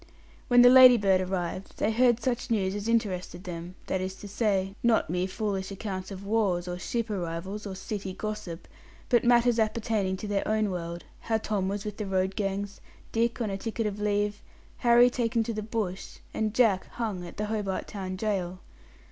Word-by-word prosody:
When 245 -1 +7
the 245 - +9
Ladybird 240 -8 +7
arrived, 185 0 -4
they 215 - +1
heard 240 0 +4
such 245 -1 -1
news 195 -4 +1
as 205 +1 -4
interested 190 -6 -1
them 175 0 -7
that 190 - -1
is 185 0 -3
to 205 - -10
say, 195 -2 0
not 230 -8 +2
mere 180 +1 0
foolish 195 -1 -3
accounts 190 -1 -5
of 195 0 -8
wars 200 -5 +1
or 180 0 -4
ship 230 +3 -2
arrivals, 190 +3 -4
or 190 - -5
city 195 0 -5
gossip, 210 -6 -5 0.4
but 240 -2 +4
matters 240 -1 +4
appertaining 215 -3 0
to 210 - -6
their 205 -1 -1
own 215 -1 +1
world 170 -1 -5 0.2
how 225 -1 0
Tom 210 -3 -1
was 205 +1 -3
with 210 -1 -5
the 210 - -4
road 190 0 0
gangs, 200 0 -3 0.3
Dick 230 +2 0
on 215 -3 -1
a 195 - -2
ticket 225 +1 -3
of 210 -1 -3
leave, 205 0 0 0.4
Harry 240 0 +6
taken 230 -2 0
to 230 - -3
the 215 - -3
bush, 210 -4 -4 0.2
and 215 0 -1
Jack 220 -7 +3
hung 215 -7 -3
at 175 - -10
the 210 - -1
Hobart 210 -3 -2
Town 190 -2 -5
Gaol. 185 -3 -2
205 Hz, 190 wpm, -28 LUFS, 190-225 Hz, 0.4 s, the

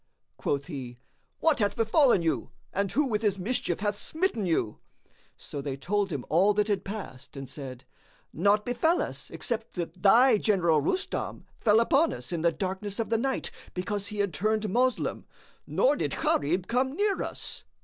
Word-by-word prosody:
Quoth 140 -1 -1
he, 130 -7 -7 0.4
"What 320 -4 +3
hath 205 -2 +1
befallen 225 - +4
you 165 - 0 0.2
and 200 0 0
who 295 - +2
with 220 -5 -1
his 205 -3 +1
mischief 190 -3 -1
hath 205 -1 -1
smitten 315 - -1
you?" 135 -10 0 0.6
So 145 - -6
they 135 -1 -4
told 200 +7 0
him 140 -5 -3
all 195 +6 +4
that 210 +1 +1
had 200 -2 0
passed 145 -11 -7
and 135 -1 -6
said, 130 -2 -8 0.5
"Naught 205 +5 +3
befel 320 +8 +2
us - - -4
except 230 -2 -4
that 175 0 -5
thy 230 +3 +6
general 170 -8 +3
Rustam, 365 - -2
fell 220 -1 +5
upon 275 +7 +3
us - - -6
in 170 -2 -1
the 170 0 +3
darkness 190 +4 -4
of 230 - -1
the 225 - +4
night 265 +2 -1 0.2
because 200 +2 -2
he 210 0 -6
had 200 -4 0
turned 215 +5 0
Moslem; 250 +5 0 0.4
nor - - +3
did - - -2
Gharib 175 +6 +1
come 255 +5 0
near 410 +1 +1
us." - - -5
205 Hz, 175 wpm, -28 LUFS, 170-230 Hz, 0.6 s, thy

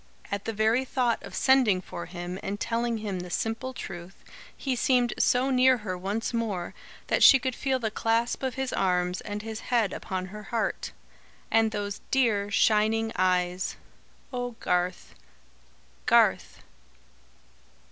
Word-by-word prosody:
At 200 0 -3
the 225 - -1
very 220 +4 +2
thought 250 -3 0
of - - -9
sending 255 -8 +4
for 175 -2 -7
him 175 +1 -6
and 200 +1 -4
telling 235 0 -1
him 205 -4 -4
the 180 0 -7
simple 225 +8 -2
truth, 180 -6 -8 0.4
he 265 -2 -1
seemed 245 0 +2
so 255 +2 +3
near 255 0 +5
her 185 -2 -2
once 200 +6 -3
more, 210 -7 -2 0.3
that - - 0
she 270 - +9
could 260 0 -2
feel 265 +1 0
the 225 -4 -2
clasp 230 +2 0
of 260 -2 -2
his 265 -1 -2
arms, 180 -1 0
and 210 0 -5
his 220 -1 -5
head 230 -6 0
upon 185 0 -4
her 210 - -7
heart. 225 +2 -2 0.6
And 225 0 +4
those 205 -2 -4
dear 220 -6 +2
shining 220 +2 +2
eyes! 180 0 +1 0.6
Oh, 245 -1 -3
Garth, 180 0 -1 0.9
Garth! - - +3
220 Hz, 145 wpm, -27 LUFS, 190-245 Hz, 0.9 s, she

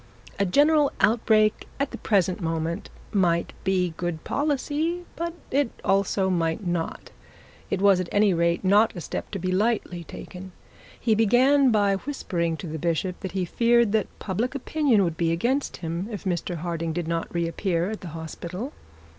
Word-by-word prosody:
A 200 - +2
general 290 - +4
outbreak 215 -1 +3
at 280 0 0
the - - -6
present 190 -2 +1
moment 165 +2 -2 0.2
might 175 -5 +1
be 185 -3 +1
good 175 -3 -3
policy, 300 +4 -1
but 340 +1 -2 0.2
it 280 -2 +2 0.2
also 195 0 +2
might 170 +1 0
not. 175 -2 -3 0.6
It 195 - -1
was 200 -2 +6
at 185 - -3
any 205 -1 +4
rate 170 +1 +1
not 205 +4 +4
a - - -5
step - - -5
to 200 - -4
be 185 0 -2
lightly 190 -3 0
taken. 180 +3 -10 0.5
He 230 - +2
began 255 +6 +4
by 205 -3 +3
whispering 175 - -2
to - - -7
the 160 0 -5
bishop 175 +2 -1
that 190 - -6
he 190 -2 0
feared 235 +3 +3
the 220 -2 +1
public 225 +7 -2
opinion 275 -6 +2
would 165 -3 -2
be 165 -1 +1
against 245 +12 0
him 170 +3 -4
if 210 -3 -6
Mr 175 -2 -2
Harding 165 -1 -3
did 170 0 -3
not 165 0 -2
reappear 170 +2 -1
at 220 - -6
the 180 - -7
hospital. 175 - -6
190 Hz, 170 wpm, -25 LUFS, 170-230 Hz, 0.6 s, was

